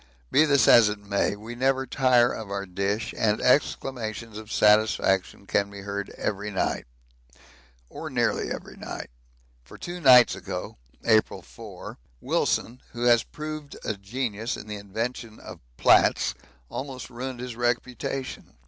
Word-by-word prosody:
Be 155 - +5
this 140 -6 +4
as 115 -3 +8
it 105 - -3
may, 100 0 -1
we 110 +3 -9
never 130 +2 +1
tire 125 -1 +3
of 110 -3 -7
our 100 0 -3
dish 100 +4 -2
and 105 -1 +1
exclamations 115 -4 0
of 110 0 -9
satisfaction 105 -2 +3
can 100 0 0
be 100 0 -9
heard 100 0 -4
every 105 0 -2
night 95 - -1 1.0
or - - -7
nearly - - 0
every - - -7
night, - - -7 0.5
for 60 - -13
two 175 0 -7
nights 125 -4 +8
ago - - -6 0.3
[April 110 -2 +2
4] - - -10 0.2
Wilson, 120 - -1
who 120 -1 -4
has 120 -1 +5
proved 155 +1 -7
a - - 0
genius 110 +2 -3
in - - -9
the 105 -1 -6
invention 110 +3 -5
of - - -10 0.2
'plats,' - - +4 0.3
almost 130 - -6
ruined 125 +1 -5
his 125 -1 -6
reputation. 125 - -3
115 Hz, 145 wpm, -26 LUFS, 105-125 Hz, 1.0 s, as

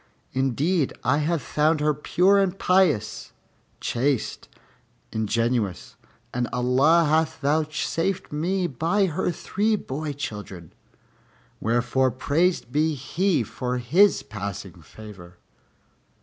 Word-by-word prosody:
Indeed, 135 +5 +1
I 130 +3 +2
have 160 +1 0
found 155 +1 +1
her 150 0 +2
pure 180 +7 +3
and 195 -1 0
pious, 155 - +1 0.5
chaste 130 0 -1 0.6
and 110 - -1
ingenuous, 115 -5 -1 0.4
and 125 0 -1
Allah 135 +7 +3
hath 160 +1 +1
vouchsafed 155 +5 -1
me 175 +5 -1
by 170 - +1
her 180 +1 -1
three 210 +5 0
boy 150 -5 -4
children; 105 - -7 0.9
wherefore 120 +3 +1
praised 145 +3 0
be 155 +2 +1
He 160 +4 0
for 125 +3 -3
His 150 +7 +3
passing 100 -7 -7
favor." 95 -5 -13
145 Hz, 105 wpm, -24 LUFS, 120-170 Hz, 0.9 s, pure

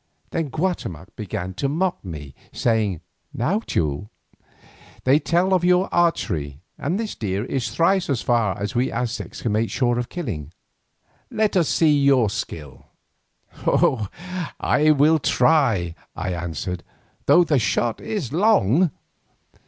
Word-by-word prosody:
Then 165 -4 -1
Guatemoc 115 - -3
began 95 -3 -5
to 140 +8 -1
mock 175 +5 -1
me, 75 -7 -8 0.2
saying, 110 -7 0 0.3
"Now, 170 - +1
Teule, 80 - -2 0.9
they 135 +3 +4
tell 175 +3 +1
tales - - +2
of 175 - -6
your 180 +2 +3
archery, 80 - 0 0.2
and 170 +8 -2
this 225 -2 -3
deer 100 0 -2
is 130 -2 -2
thrice 185 +2 +2
as 135 -5 0
far 115 -5 +1
as 100 0 -3
we 125 +2 +1
Aztecs 125 0 -4
can 115 - 0
make 110 +2 +1
sure 120 -2 +1
of 120 - -4
killing. 95 - -5 0.8
Let 215 -2 0
us 170 -5 +3
see 155 -3 +4
your 135 -7 +4
skill." 75 -8 -6 1.7
"I 155 +1 +3
will 155 +2 +5
try," 115 - +2 0.2
I 90 - -3
answered, 85 +1 -4 0.5
"though 175 - +7
the 150 -5 +2
shot 115 0 0
is 175 - -4
long." 175 - +4
125 Hz, 135 wpm, -23 LUFS, -, 1.7 s, though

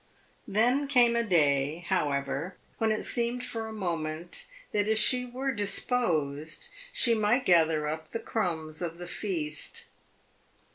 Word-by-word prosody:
Then 245 +7 +2
came 245 -4 +5
a 235 - +2
day, 150 -4 +2
however, 145 0 -1 0.2
when 225 -1 +2
it 215 - -1
seemed 240 +1 0
for 225 -1 -4
a - - -7
moment 170 -4 -3 0.2
that 205 0 +1
if 220 0 +2
she 250 +3 +4
were 260 +2 -2
disposed 160 - 0 0.2
she 240 - +3
might 225 +4 +2
gather 160 -3 +4
up 160 +1 -4
the - - -3
crumbs 160 -9 -3
of 170 -1 -3
the 175 - -7
feast. 175 -4 -3
185 Hz, 140 wpm, -29 LUFS, 155-230 Hz, 0.2 s, came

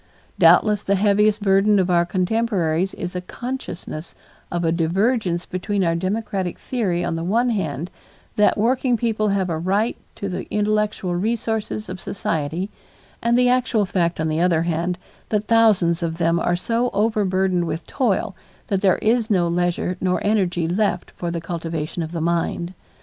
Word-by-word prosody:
Doubtless 210 -2 +5
the 200 - +1
heaviest 210 +1 +3
burden 200 +1 +4
of 185 -1 +2
our 170 -1 +3
contemporaries 185 -3 0
is 180 0 -5
a 180 - -2
consciousness 180 -8 -6 0.4
of 175 0 -1
a 165 - +2
divergence 180 +2 +1
between 195 +2 -2
our 165 -1 +2
democratic 190 0 -2
theory 190 -9 -1
on 165 - -1
the 165 - -3
one 235 +7 +2
hand, 170 -5 -3 0.4
that 210 +1 +3
working 245 +3 +2
people 220 -2 0
have 195 -2 +1
a 165 -2 -2
right 200 +7 0 0.2
to 200 - -4
the 185 - -5
intellectual 210 -3 0
resources 220 +1 -2
of 185 0 -7
society, 165 +1 -2 0.5
and 235 +1 +2
the 250 0 +4
actual 245 -4 +2
fact 175 -4 0
on 160 - 0
the 155 +1 0
other 170 -2 +3
hand, 170 +1 -1 0.3
that 210 -1 0
thousands 210 -7 +3
of 165 -1 -2
them 170 0 +2
are 175 - +1
so 230 +7 0
overburdened 190 -4 +1
with 165 0 -4
toil 220 -5 0 0.3
that 195 -2 0
there 190 -3 +4
is 225 +1 +2
no 180 -5 +2
leisure 175 +1 0
nor 180 -1 +1
energy 185 -5 +1
left 180 0 0
for 175 - -5
the 170 0 -2
cultivation 165 -1 -4
of 160 0 -4
the 170 -2 -3
mind. 170 +1 -1
185 Hz, 165 wpm, -22 LUFS, 170-215 Hz, 0.5 s, Doubtless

